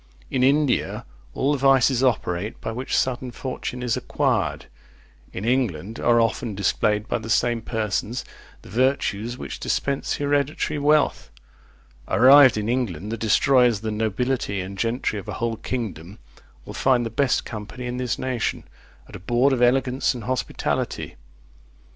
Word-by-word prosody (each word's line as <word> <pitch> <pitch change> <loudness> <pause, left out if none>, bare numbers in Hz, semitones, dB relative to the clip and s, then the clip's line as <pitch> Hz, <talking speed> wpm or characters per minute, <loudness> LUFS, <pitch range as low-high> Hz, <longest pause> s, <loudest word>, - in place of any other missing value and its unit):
In 130 - 0
India 140 0 +1 0.3
all 140 - +1
the 145 - 0
vices 135 -1 +4
operate 105 -5 -1
by - - -4
which 125 +3 -2
sudden 130 0 -1
fortune 125 0 -5
is 120 -3 0
acquired; - - -1 0.7
in 95 - -5
England 115 -5 -1
are 120 0 +3
often 115 -1 0
displayed 105 +2 0
by 120 - -1
the 110 0 -8
same 120 +1 +2
persons, 110 +2 -2 0.4
the - - -13
virtues 120 -1 0
which - - -7
dispense 140 -1 -1
hereditary 145 +1 -1
wealth. 150 +1 +2 0.8
Arrived 130 -1 +7
in 105 0 -2
England, 110 -6 -2
the - - -1
destroyers 120 +2 +3
of - - -13
the 110 - -2
nobility 110 0 -1
and 95 +1 -5
gentry 115 -2 -1
of 95 - -11
a - - -4
whole 115 -1 -2
kingdom 105 -7 -5 0.5
will - - -8
find 125 -3 +2
the 115 - -4
best 135 +2 +1
company 110 +3 -7
in 125 0 -4
this 125 -2 -2
nation, 130 -3 -2 0.4
at - - -12
a - - -7
board 120 +8 +2
of 125 - -1
elegance 130 +1 +2
and 120 - -7
hospitality. 130 +3 -2
120 Hz, 155 wpm, -23 LUFS, 110-130 Hz, 0.8 s, Arrived